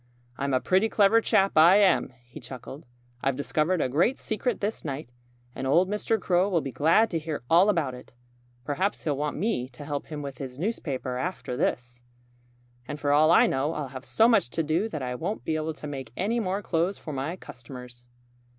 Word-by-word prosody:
"I'm 140 +1 -2
a - - +3
pretty 190 +10 +2
clever 215 +2 +4
chap, 195 -3 +3
I 165 +4 +7
am!" 200 -8 +4
he 120 - -11
chuckled. 130 +3 -9 0.3
"I've 135 -1 0
discovered 155 +5 0
a - - +1
great 165 - +2
secret 220 +3 -2
this 210 +2 -3
night. 140 -3 -5 0.4
And 135 - -4
old 170 +7 +4
Mr. 210 +2 0
Crow 185 +1 +2
will 175 -4 +2
be 135 -3 -5
glad 165 - +3
to 165 - 0
hear 155 -4 -5
all 180 +5 +6
about 160 -10 +1
it. 125 - -12 0.5
Perhaps 185 +8 -1
he'll 150 -3 0
want 145 +1 -2
me 155 - -1
to 140 +3 -11
help 145 -1 -4
him 150 -2 -6
with 140 -2 -7
his 130 -2 -7
newspaper 140 - -3
after 170 -6 -4
this. 125 0 -2 0.9
"And 145 - -5
for 145 -1 0
all 155 +2 +5
I 170 - +6
know 140 +4 0
I'll 145 -3 -4
have 130 0 -8
so 225 +10 +3
much 220 - +3
to 165 - -1
do 165 +8 0
that 155 -9 -5
I 125 0 -3
won't 175 - -4
be 160 - 0
able 155 0 -2
to 155 - -10
make 135 -5 -6
any 220 +6 0
more 200 -1 -2
clothes 175 +3 0
for 155 - -7
my 140 +6 -3
customers." 125 -5 -11
155 Hz, 205 wpm, -27 LUFS, 135-190 Hz, 0.9 s, I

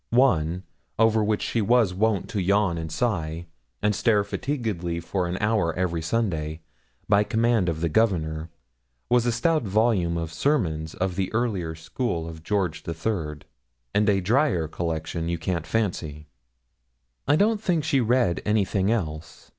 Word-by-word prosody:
One, 90 -9 +2 0.3
over 110 -1 +4
which 105 0 0
she 115 - 0
was 115 -2 +3
wont 105 +1 +1
to 100 - -1
yawn 95 -2 +2
and 80 -1 -5
sigh, 85 -5 -1 0.4
and 105 0 +3
stare 105 0 +2
fatiguedly 100 - -3
for 90 +2 -2
an 90 +1 -3
hour 105 -6 +1
every 85 -2 -1
Sunday, 80 -5 -1 0.5
by 105 0 +4
command 110 -3 +2
of 80 -1 -3
the 85 - +1
Governor, 80 -4 0 0.6
was 120 0 +3
a - - +3
stout 155 +7 +2
volume 100 -5 +1
of 80 -1 -4
sermons 80 - 0
of 90 0 -2
the 95 -2 -1
earlier 100 -9 -1
school 85 +1 -3
of 80 -1 -8
George 95 -2 -1
III., 80 -3 -3 0.5
and 105 +1 +3
a 100 -1 +3
drier 100 - +2
collection 80 +1 -3
you 85 - -1
can't 85 -1 -3
fancy. 80 -8 -2 1.0
I 145 - +5
don't 210 +4 +2
think 175 -7 +1
she 140 -4 +2
read 120 -6 +2
anything 100 -1 +1
else. 80 -8 -4
95 Hz, 155 wpm, -25 LUFS, 85-115 Hz, 1.0 s, I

